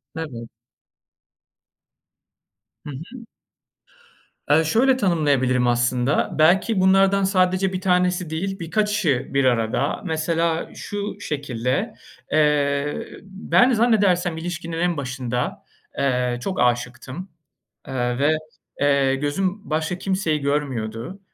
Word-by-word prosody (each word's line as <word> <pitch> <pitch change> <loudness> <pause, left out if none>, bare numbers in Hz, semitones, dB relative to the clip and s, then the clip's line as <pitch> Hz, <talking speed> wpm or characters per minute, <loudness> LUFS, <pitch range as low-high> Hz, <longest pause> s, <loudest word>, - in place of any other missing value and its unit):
Evet. 125 -8 -6 2.4
Hı - - -7 0.2
hı. 245 -2 -10 1.2
Eee, 160 +2 +5
şöyle 250 - +3
tanımlayabilirim 140 - +2
aslında. 120 +2 +1
Belki 185 +5 +4
bunlardan 195 +1 +4
sadece 185 0 +2
1 185 - -3
tanesi 180 -2 +1
değil, 195 +4 -3
birkaçı 180 - 0
bir 140 -1 +2
arada. 120 +3 0
Mesela 165 0 -1
şu 205 -1 -5
şekilde, 130 - -2 0.4
eee, 145 -1 +1 0.2
ben 205 +6 +2
zannedersem 200 -7 +2
ilişkinin 170 -1 -5
en 175 -1 0
başında, 130 -3 -3 0.3
eee, 125 -3 0
çok 185 +7 -3
aşıktım. 125 +8 -1 0.6
Eee, 125 -1 -2
ve, 155 +2 +3 0.4
eee, 140 -2 +3
gözüm 185 +9 -2
başka 160 +3 -1
kimseyi 185 -6 -1
görmüyordu. 135 - -3
160 Hz, 100 wpm, -22 LUFS, 135-190 Hz, 2.4 s, Eee